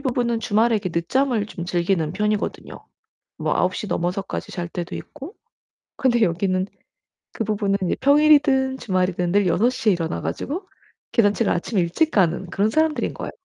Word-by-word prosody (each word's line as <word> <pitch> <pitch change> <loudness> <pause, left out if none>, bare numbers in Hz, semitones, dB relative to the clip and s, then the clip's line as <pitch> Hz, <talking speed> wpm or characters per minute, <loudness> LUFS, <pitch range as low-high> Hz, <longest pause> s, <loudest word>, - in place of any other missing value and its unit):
부부는 240 -4 0
주말에 225 +2 +2
이렇게 200 -4 -1
늦잠을 220 +6 0
좀 175 -4 -7
즐기는 175 -2 0
편이거든요 210 +2 -2 0.7
뭐 - - -1
9시 185 +3 0
넘어서까지 180 +1 -3
잘 175 -1 -4
때도 175 0 -5
있고. 300 - -10 0.6
근데 240 -3 +2
여기는 185 0 +1 0.7
그 - - -2
부부는 200 -2 0
이제 180 - 0
평일이든 280 -2 +4
주말이든 180 -5 -1
늘 200 0 +3
6시에 225 +4 +2
일어나 165 -2 -3
가지고 365 +7 -4 0.5
개산책을 205 -5 +2
아침에 185 +3 0
일찍 240 - +1
가는 180 -2 +2
그런 205 +2 +1
사람들인 315 +4 +1
거예요. - - -6
205 Hz, 360 characters per minute, -22 LUFS, 180-255 Hz, 0.7 s, 평일이든